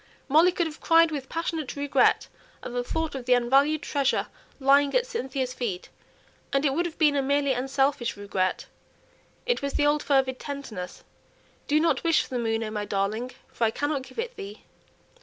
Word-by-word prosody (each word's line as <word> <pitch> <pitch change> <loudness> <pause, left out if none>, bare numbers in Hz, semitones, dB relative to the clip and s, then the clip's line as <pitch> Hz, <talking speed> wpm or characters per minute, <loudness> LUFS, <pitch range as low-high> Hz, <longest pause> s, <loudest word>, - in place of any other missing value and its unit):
Molly 320 +6 +5
could 345 -1 0
have 310 -2 -7
cried 330 0 +5
with 280 -3 -5
passionate 325 -3 -3
regret 285 0 +2 0.4
at 245 - -6
the 245 0 -1
thought 320 +5 -2
of 265 -3 -6
the 250 0 +5
unvalued 275 +5 +3
treasure 280 -2 0 0.3
lying 280 +1 +4
at - - +3
Cynthia's 265 - -3
feet; 215 -8 -4 0.6
and 275 +2 +1
it 275 - +2
would 345 +4 0
have 330 - -10
been 300 -3 +4
a 280 - +2
merely 280 0 +1
unselfish 270 -2 0
regret. 195 -2 -1 0.8
It 485 0 0
was 280 0 -3
the 290 - +2
old 295 0 +2
fervid 265 -2 +1
tenderness: 230 -11 -7 0.6
"Do 300 +1 +3
not 330 +1 +1
wish 330 -2 +3
for - - -13
the 250 - -2
moon, 225 -1 0
O 215 - -4
my 210 -1 -3
darling, 205 +4 -2 0.2
for 235 - +1
I - - +3
cannot 290 +4 -2
give 260 0 -14
it 470 +2 -3
thee." 205 +2 -9
275 Hz, 190 wpm, -26 LUFS, 245-305 Hz, 0.8 s, Molly